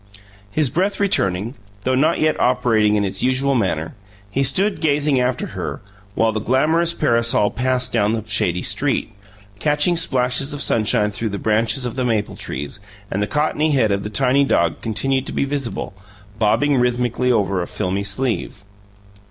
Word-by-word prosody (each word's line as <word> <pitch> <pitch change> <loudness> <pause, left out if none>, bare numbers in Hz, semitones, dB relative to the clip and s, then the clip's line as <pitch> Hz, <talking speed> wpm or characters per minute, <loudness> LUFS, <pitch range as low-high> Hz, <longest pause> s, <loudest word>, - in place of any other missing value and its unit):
His 145 +4 0
breath 190 +5 0
returning, 105 - 0 0.3
though 130 - +1
not 155 +6 +2
yet 155 0 +1
operating 110 -4 +2
in 100 -1 +1
its 95 - -3
usual 130 +2 +1
manner, 85 -9 -1 0.4
he 135 - 0
stood 190 +10 +1
gazing 145 -3 +2
after 125 0 0
her, - - -4 0.4
while 115 0 +2
the 110 - -2
glamorous 160 +8 +2
parasol 115 -7 +2
passed 130 0 0
down 110 -2 +2
the 110 -2 -2
shady 90 -4 +2
street, 135 -5 -1 0.5
catching 150 +5 +2
splashes 130 -2 0
of 145 - -5
sunshine 105 -1 +1
through 110 +2 -3
the 100 - -4
branches 110 +4 +1
of 120 - -4
the 130 - -1
maple 110 -4 -1
trees; 75 +6 -5 0.3
and 100 - -1
the 105 - 0
cottony 150 +2 0
head 115 -6 +2
of 100 0 0
the 105 - -5
tiny 135 +5 +2
dog 85 - +1
continued 135 +4 -1
to - - -5
be - - 0
visible, 135 -7 -3 0.5
bobbing 140 +6 +2
rhythmically 125 0 +1
over 100 -5 +1
a 85 - -4
filmy 95 +2 -2
sleeve. 105 -1 -3
125 Hz, 170 wpm, -20 LUFS, 105-140 Hz, 0.5 s, not